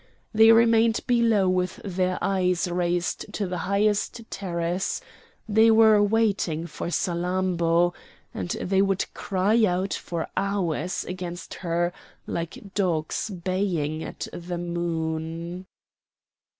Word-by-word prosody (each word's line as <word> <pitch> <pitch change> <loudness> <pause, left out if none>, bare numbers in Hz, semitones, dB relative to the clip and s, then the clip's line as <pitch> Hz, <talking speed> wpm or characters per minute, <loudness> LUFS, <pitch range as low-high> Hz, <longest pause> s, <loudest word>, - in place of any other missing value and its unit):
They 225 +1 +7
remained 230 0 +4
below 230 -5 +3
with 185 0 0
their 185 -1 0
eyes 180 -2 +1
raised 175 0 -1
to 205 - -1
the 180 -1 -3
highest 210 +3 +1
terrace; 175 -1 -2 0.5
they 220 +1 +5
were 220 -1 +6
waiting 200 -6 +1
for 170 - -6
Salammbô, 175 -1 +1 0.4
and - - -4
they 190 +1 +2
would 195 -1 +1
cry 205 +4 +1
out 185 -1 +1
for 170 -2 -4
hours 190 -3 -1
against 180 -1 -6
her 175 0 -1 0.3
like 170 +4 -5
dogs 175 -1 -1
baying 175 -5 -2
at - - -6
the 175 0 -5
moon. 170 +1 -3
185 Hz, 110 wpm, -25 LUFS, 170-200 Hz, 0.5 s, They